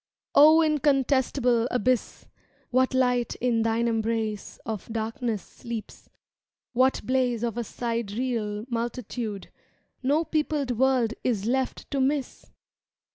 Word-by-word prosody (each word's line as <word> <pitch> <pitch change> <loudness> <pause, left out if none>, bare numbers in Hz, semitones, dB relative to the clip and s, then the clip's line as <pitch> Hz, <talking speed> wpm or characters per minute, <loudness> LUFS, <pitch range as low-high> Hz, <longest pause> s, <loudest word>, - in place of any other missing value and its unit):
O 310 +3 +7
incontestable 270 -5 +2
Abyss, 250 0 0 0.5
What 260 +1 +2
light 250 -2 +1
in 235 -2 +1
thine 230 +1 +1
embrace 225 -2 -2
of 220 0 -5
darkness 225 -1 -2
sleeps— 230 -2 -8 0.6
What 255 +2 +3
blaze 250 -3 +1
of 235 -3 -1
a 240 - -2
sidereal 230 -1 -3
multitude 235 -3 -4
^^ - - -40 0.4
No 290 +5 +2
peopled 300 -4 -1
world 245 -1 +2
is 215 -5 0
left 260 +2 -1
to 275 - 0
miss! 275 0 -1
245 Hz, 115 wpm, -26 LUFS, 225-260 Hz, 0.6 s, O